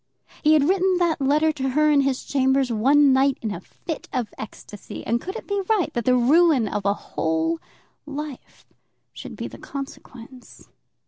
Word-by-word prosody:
He 305 0 +4
had 300 -2 +4
written 375 0 +2
that 340 -4 +1
letter 300 +3 +3
to 270 -3 -3
her 305 +3 +3
in 285 -1 +4
his 270 -1 -1
chambers 265 -1 +1
one 275 +5 +4
night 270 0 +3
in 220 - -2
a 175 - -7
fit 320 - -8
of 245 -5 -3
ecstasy; 210 -1 -9
and 230 +2 0
could 375 +3 -6
it - - -7
be 405 -1 -1
right 425 -7 +1
that 235 -2 -2
the 250 0 +4
ruin 280 -1 +4
of 205 0 -3
a 200 - +3
whole 160 -2 -2 0.5
life 295 -2 -8 0.5
should - - -9
be - - -5
the - - -12
consequence? 255 -2 -10
275 Hz, 180 wpm, -23 LUFS, 235-305 Hz, 0.5 s, He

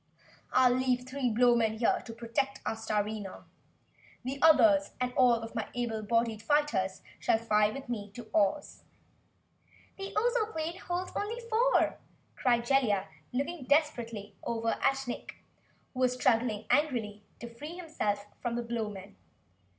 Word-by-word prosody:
I'll 255 -1 +5
leave 250 -1 +1
three 260 -1 -1
Blowmen 230 -1 +3
here 230 - +2
to - - -6
protect 240 +4 -2
our - - 0
Starina. 210 -2 -3 0.8
The 270 +2 -4
others, 300 -2 +5
and 250 0 -1
all 250 -2 +5
of 225 0 -6
my 225 -3 -3
able 235 -3 -2
bodied 230 0 0
fighters, 225 -8 +1 0.2
shall - - +3
fly 210 -2 +2
with 275 +5 -7
me 210 -4 -4
to 240 -2 -8
Ohs." 215 +8 +1 1.2
"The 390 0 -5
Ozoplane 425 -7 0
holds 355 +1 -3
only 440 +4 -2
four!" 475 +2 +2 0.4
cried 240 -2 +2
Jellia, 240 -10 +2 0.2
looking 280 +3 -3
desperately 240 -8 0
over 230 -1 -1
at 270 -1 +1
Nick 245 - -6 0.6
who 255 - -6
was 255 -1 +3
struggling 225 -4 +1
angrily 230 -9 +1 0.2
to 235 0 -8
free 300 +8 -8
himself 215 - -2 0.2
from 240 -1 -2
the 240 - -2
Blowmen. 210 - -5
240 Hz, 140 wpm, -30 LUFS, 220-280 Hz, 1.2 s, I'll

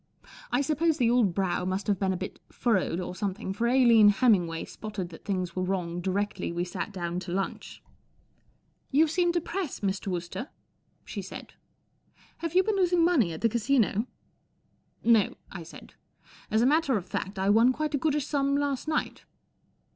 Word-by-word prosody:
I 245 +3 +2
suppose 310 +3 +1
the 235 -3 +3
old 225 -8 +3
brow 190 -2 0
must 185 +2 -2
have 200 -3 0
been 190 -1 +1
a 185 - -1
bit 190 - -6
furrowed 190 -7 0
or 180 - -4
something, 195 0 -3
for 230 +4 0
Aline 235 -4 +6
Hemmingway 190 -7 +2
spotted 205 -5 -6
that 165 - -13
things 185 -4 -2
were 185 - -1
wrong 180 -2 -2
directly 195 0 -2
we 175 +1 -2
sat 180 +3 -4
down 175 -2 -3
to 180 -1 -7
lunch. 195 +2 -4 0.5
" - - -40
You 320 - +6
seem 345 +2 +1
depressed, 345 - -3
Mr. 195 0 -2
Wooster," 180 - -4 0.6
she - - -5
said. - - -9 0.4
" - - -32
Have 335 0 -4
you 370 - +6
been 425 0 0
losing 355 -3 +3
money 275 - +3
at 160 - -7
the 230 - +3
Casino? 230 -1 +1 0.3
" - - -44
' - - -40
No," 210 -4 +1 0.2
I 185 - -7
said. 165 +1 -12 0.6
"As 220 +2 +2
a - - +4
matter 285 -3 +3
of 185 - -5
fact, 195 +1 -4
I 190 +1 +2
won 230 +4 +5
quite 305 +3 -3
a 285 - +1
goodish 295 -1 0
sum 280 -1 0
last 285 -1 -1
night." 310 -1 -2
215 Hz, 185 wpm, -28 LUFS, 185-280 Hz, 0.6 s, Aline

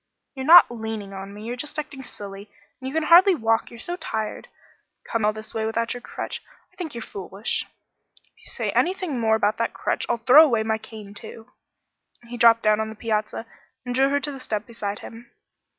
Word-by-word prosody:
"You're 265 0 -5
not 340 -5 +9
leaning 220 -4 -5
on 195 0 -7
me. 205 +1 -10
You're 235 +2 -4
just 295 +4 -6
acting 295 -3 -5
silly, 200 -4 -9 0.3
and 260 - -6
you - - -8
can 320 - +1
hardly 355 +4 +7
walk, 225 -5 +1
you're 235 - -12
so 350 +9 -3
tired! 220 -9 -4 0.6
Coming 230 -3 -1
all - - +4
this 215 0 -8
way 220 - -2
without 230 +1 -1
your 245 - -8
crutch. - - -5 0.3
I - - -27
think 320 -8 -6
you're 235 - -5
foolish." 195 +3 -4 0.6
"If - - -40
you - - -19
say - - -3
anything 360 -7 0
more 220 -1 +3
about 215 -1 +1
that 230 - -2
crutch, - - -2
I'll 240 - +1
throw 260 +7 +8
away 235 -8 +2
my 220 0 -1
cane 215 -2 -11
too." 225 +3 -11 0.7
He 240 +1 -8
dropped 230 -1 +6
down 215 0 +3
on 220 0 -2
the 220 - -8
piazza 215 0 -2 0.4
and 245 - -3
drew 270 +2 +3
her 285 +1 +2
to 290 - -3
the 270 - -8
step 215 -4 -3
beside 210 -3 -5
him. 235 +1 -11
230 Hz, 215 wpm, -24 LUFS, 215-265 Hz, 0.7 s, not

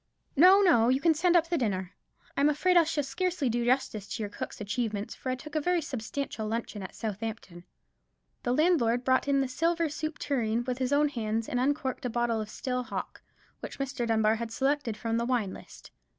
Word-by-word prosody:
"No, 370 +7 +7
no; 240 - +5
you 260 +1 +3
can 330 +2 +4
send 345 +3 +2
up 335 -1 +4
the 335 -1 0
dinner. 190 -6 -2 0.4
I'm 285 +1 +4
afraid 360 +5 +2
I 340 -2 +7
shall 310 -2 -1
scarcely 345 -1 -1
do 240 +1 0
justice 240 -5 0
to 225 - -4
your 205 - -5
cook's - - -6
achievements, 210 0 -3
for 260 - -6
I 255 - 0
took 300 +3 -11
a 310 - 0
very 355 +3 +2
substantial 255 -4 -4
luncheon 225 -2 -3
at 190 - -8
Southampton." 210 -5 -5 0.8
The 245 - -1
landlord 255 -5 +3
brought 260 +2 +2
in 275 -1 +3
the 270 - 0
silver 330 +5 0
soup 310 +1 -4
tureen 235 -4 0
with 250 0 -3
his 260 0 -1
own 295 +1 +3
hands, 225 -3 -2
and 245 - -1
uncorked 270 0 -1
a - - 0
bottle 235 -1 0
of 215 - -6
still 250 +2 -3
hock, 250 - -6 0.4
which - - -8
Mr. 275 -3 -3
Dunbar 220 -1 +3
had 230 0 -4
selected 270 -3 0
from 225 +1 -1
the 235 - 0
wine 235 -6 0
list. - - -13
250 Hz, 210 wpm, -29 LUFS, 225-295 Hz, 0.8 s, No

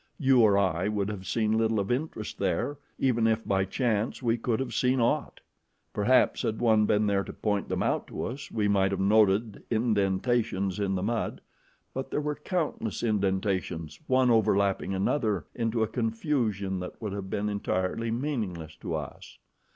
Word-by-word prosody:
You 135 -4 +4
or 105 -3 +5
I 95 -2 +1
would 105 -1 -1
have 95 -3 -6
seen 110 -1 +1
little 110 -1 +2
of 100 +2 -1
interest 125 -4 -3
there, 115 +9 -1 0.2
even 120 -4 +2
if, 110 0 0
by 95 -1 +2
chance, 110 +3 -1
we 115 -1 +2
could 115 -1 -1
have 135 -2 -3
seen 130 +1 +2
aught. 115 - 0 0.5
Perhaps 125 +5 +3
had 110 - -1
one 110 -3 +4
been 105 +1 +3
there 100 -1 +1
to - - -7
point 105 -2 -2
them - - 0
out - - 0
to - - -5
us, 135 +4 -5
we 105 -2 0
might 100 -1 +3
have 100 -1 -2
noted 105 +1 +3
indentations 105 -2 +1
in 100 -1 0
the 90 - -2
mud, 115 +2 -2 0.5
but 130 0 -4
there - - -1
were 150 0 -1
countless 150 - -3
indentations, 95 -7 -1
one 130 -1 +4
overlapping 100 -3 +2
another 100 - 0
into 115 -1 0
a - - 0
confusion 110 - -1
that 90 - -7
would 105 -4 -4
have 100 -1 -5
been 105 +2 -1
entirely 100 +2 -1
meaningless 110 - -3
to - - -4
us. - - -7
110 Hz, 175 wpm, -28 LUFS, 100-120 Hz, 0.5 s, or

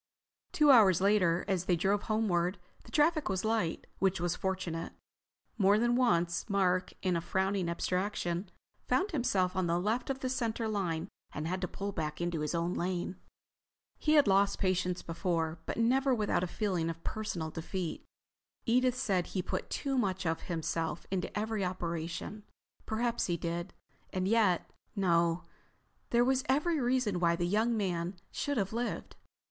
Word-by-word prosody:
Two 300 -2 +5
hours 205 -9 +7
later, 185 -3 +3
as 185 -3 0
they 180 - +3
drove 195 +4 +1
homeward, 195 -5 +1 0.3
the - - -14
traffic 310 0 +3
was 190 +2 -1
light, 220 -7 0
which 190 -2 +2
was 175 0 0
fortunate. 185 -4 -3 0.7
More 200 +1 +5
than 240 +2 +2
once 175 -7 +2
Mark, 185 -2 +2
in 185 -2 +2
a 170 - 0
frowning 190 0 0
abstraction, 180 0 -1 0.4
found 390 +3 +1
himself 195 - +1
on 185 -2 +1
the 170 +1 +1
left 220 +8 -1
of 265 -1 -2
the 260 - -1
center 230 -3 -1
line 180 -5 -1 0.3
and 150 +2 -3
had 185 +2 -2
to 180 - -1
pull 200 +2 -4
back 155 -4 -3
into 175 -2 -1
his 150 +2 -1
own 170 +1 0
lane. 180 +1 -2 0.8
He 305 - +2
had 295 -2 +7
lost 200 +1 +4
patients 185 -2 0
before, 165 -2 -1
but - - -3
never 260 +3 +3
without 210 -5 +1
a - - 0
feeling 180 -4 -1
of 165 0 -6
personal 175 -7 -3
defeat. 165 +1 -4 0.6
Edith 250 +1 +3
said 185 -7 0
he 185 - -2
put - - -3
too 270 -2 -1
much 190 -4 -1
of 160 0 0
himself 165 -1 -2
into 190 +1 -2
every 215 -1 -1
operation. 170 +2 -3 0.5
Perhaps 235 +2 0
he 175 -2 0
did. 170 +2 -3 0.4
And 185 0 -1
yet—No, 180 -4 +1 0.7
there 240 0 +4
was 260 0 +2
every 300 +4 +2
reason 245 -7 +1
why 170 -1 +3
the 175 0 -1
young 220 +5 +2
man 180 -2 -1 0.2
should 285 -2 -2
have 195 -1 -1
lived. 235 +1 -3
190 Hz, 165 wpm, -32 LUFS, 175-225 Hz, 0.8 s, hours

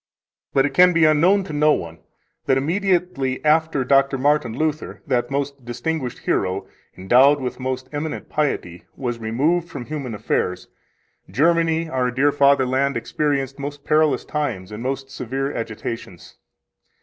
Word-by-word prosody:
4 135 - +4
But - - +2
it 145 - -2
can 180 +2 +6
be 165 -1 +4
unknown 170 +6 +4
to 185 - -8
no 150 +1 +4
one 80 - -5 0.5
that, 135 - +3
immediately 170 -4 0
after 155 -2 +2
Dr. 135 +1 +3
Martin 130 -4 +1
Luther, 155 0 -3
that 125 -3 0
most 140 -1 -3
distinguished 125 +3 -4
hero, 95 +1 0 0.3
endowed 130 +10 +5
with 130 -1 -4
most 130 0 -3
eminent 150 +1 -4
piety, 110 - -2
was 120 -3 -4
removed 150 +10 0
from 120 - -7
human 140 -6 -5
affairs, 90 -3 -2 0.6
Germany, 165 +2 +2
our 130 -4 0
dear 135 +4 +2
fatherland, 140 -1 +2
experienced 140 -3 -2
most 145 0 -6
perilous 155 0 +2
times 120 -11 -3
and 105 +1 -7
most 135 +1 -4
severe 135 +2 -3
agitations. 110 -5 -6
140 Hz, 145 wpm, -21 LUFS, 125-150 Hz, 0.6 s, can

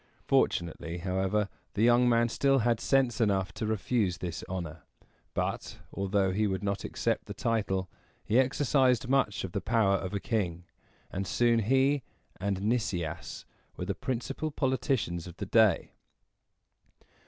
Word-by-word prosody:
Fortunately, 85 0 0
however, 95 +3 0 0.3
the 105 - +2
young 120 +1 +5
man 115 0 +4
still 135 +3 +2
had 120 -2 +2
sense 130 -2 +2
enough 95 -4 +1
to 110 - -3
refuse 105 -3 0
this 85 -3 -5
honor; 85 -4 -5 0.5
but, - - -2 0.2
although 100 -1 +1
he 105 +3 +1
would 95 0 -2
not 100 0 -1
accept - - -1
the - - -7
title, 95 -5 0 0.4
he 115 +4 +3
exercised 130 -2 +2
much 135 -6 +1
of 95 - -5
the 100 - -2
power 110 -3 +2
of 95 +1 -4
a - - 0
king, 90 -6 -2 0.5
and 95 0 -3
soon 120 +2 +3
he 135 +5 +3 0.4
and 100 -1 -2
Nicias 90 - -2 0.3
were 90 - -3
the 100 - -1
principal 130 +7 -3
politicians 130 - -1
of 85 - -11
the - - -4
day. 110 -6 +3
105 Hz, 145 wpm, -29 LUFS, 95-120 Hz, 0.5 s, young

